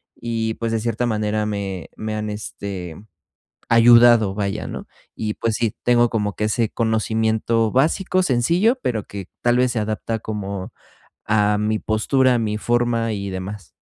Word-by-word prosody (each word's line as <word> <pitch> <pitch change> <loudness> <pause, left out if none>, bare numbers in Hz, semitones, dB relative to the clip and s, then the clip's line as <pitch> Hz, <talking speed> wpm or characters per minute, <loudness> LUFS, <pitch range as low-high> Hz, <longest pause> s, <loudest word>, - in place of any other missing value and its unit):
y, 115 -1 -2
pues, 115 -1 -3
de 115 - 0
cierta 115 +1 -1
manera, 105 -1 -1
me 100 -4 -4
me 110 0 -4
han, 105 0 -3
este, 100 -5 -6 0.8
ayudado, 115 -3 +6
vaya, 100 0 -2
¿no? - - -7 0.3
Y, 105 -1 -3
pues, 115 -1 -1
sí, 115 -3 -1
tengo 120 -1 +4
como 105 -3 -1
que 105 - -2
ese 110 +1 +1
conocimiento 110 0 0
básico, 180 +7 +2
sencillo, 175 - +2
pero 110 -5 -1
que, 100 -2 -8
tal 120 0 +3
vez, 125 -1 +2
se 120 - -2
adapta 110 +1 -2
como 100 -3 -5 0.5
a 105 -1 +2
mi 105 +1 0
postura, 125 +4 +2
a - - +1
mi 105 -2 -1
forma 120 0 0
y 100 -1 -4
demás. 95 +2 -7
110 Hz, 160 wpm, -21 LUFS, 105-120 Hz, 0.8 s, ayudado